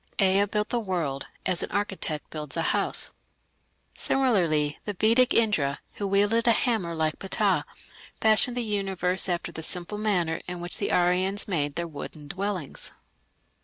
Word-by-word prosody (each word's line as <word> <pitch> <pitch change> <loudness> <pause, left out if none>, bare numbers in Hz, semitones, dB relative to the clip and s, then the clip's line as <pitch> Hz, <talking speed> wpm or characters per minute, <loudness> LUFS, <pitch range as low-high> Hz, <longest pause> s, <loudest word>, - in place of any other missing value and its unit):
Ea 195 0 +4
built 210 +1 -2
the 240 - 0
world 170 -10 -3 0.2
"as 180 - +4
an - - -3
architect 195 -7 -2
builds 150 -1 -5
a 165 - +1
house". - - +2 0.8
Similarly 170 - +1
the 205 - -3
Vedic 230 +6 +4
Indra, 160 -12 +2 0.2
who 200 - -2
wielded 205 +4 +2
a 235 - +7
hammer 215 -8 0
like 155 -1 -1
Ptah, 195 - +1 0.5
fashioned 220 +3 +4
the 245 - 0
universe 195 -3 -1
after 175 -1 -2
the 160 - -7
simple 180 +5 -3
manner 180 -6 0
in 180 -1 -5
which 175 0 -2
the - - -1
Aryans 185 +3 +2
made 145 -7 -1
their 170 0 -2
wooden 150 -1 -9
dwellings. 190 -4 -3
185 Hz, 155 wpm, -26 LUFS, 165-210 Hz, 0.8 s, a